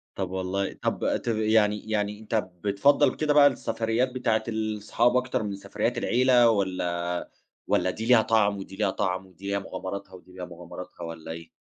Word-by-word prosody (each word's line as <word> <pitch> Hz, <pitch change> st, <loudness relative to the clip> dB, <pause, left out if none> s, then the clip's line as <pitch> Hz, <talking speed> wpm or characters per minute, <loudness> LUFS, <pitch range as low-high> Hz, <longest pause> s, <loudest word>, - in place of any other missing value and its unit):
طب 95 Hz, -2 st, -3 dB
والله 95 Hz, +1 st, -2 dB
طب -, -, 0 dB
تب 115 Hz, -2 st, +1 dB
يعني 110 Hz, -1 st, +2 dB
يعني 105 Hz, -1 st, -1 dB
أنت 110 Hz, +1 st, -4 dB, 0.3 s
بتفضّل 130 Hz, +7 st, +3 dB
كده 150 Hz, -1 st, +1 dB
بقى 145 Hz, -1 st, +8 dB
السفريّات 115 Hz, -1 st, 0 dB
بتاعتة 115 Hz, -3 st, 0 dB
ال 110 Hz, -2 st, -3 dB
صحابك 120 Hz, +3 st, +2 dB
أكتر 110 Hz, -, -1 dB
من 100 Hz, -1 st, -3 dB
سفريّات 100 Hz, 0 st, -2 dB
العيلة 125 Hz, -1 st, +4 dB
والّا 90 Hz, -4 st, -1 dB, 0.4 s
والّا 90 Hz, +1 st, +2 dB
دي 110 Hz, +4 st, -4 dB
ليها 120 Hz, -1 st, +6 dB
طعم 105 Hz, -2 st, +2 dB
ودي 95 Hz, 0 st, -8 dB
ليها 100 Hz, 0 st, +1 dB
طعم 95 Hz, 0 st, -2 dB
ودي 95 Hz, +1 st, -11 dB
ليها 100 Hz, 0 st, 0 dB
مغامراتها 95 Hz, +1 st, -6 dB
ودي 90 Hz, 0 st, -14 dB
ليها 90 Hz, -1 st, -6 dB
مغامراتها 90 Hz, +1 st, -10 dB
والّا 80 Hz, -1 st, -7 dB
إيه؟ 80 Hz, 0 st, -9 dB
105 Hz, 175 wpm, -26 LUFS, 95-115 Hz, 0.4 s, بقى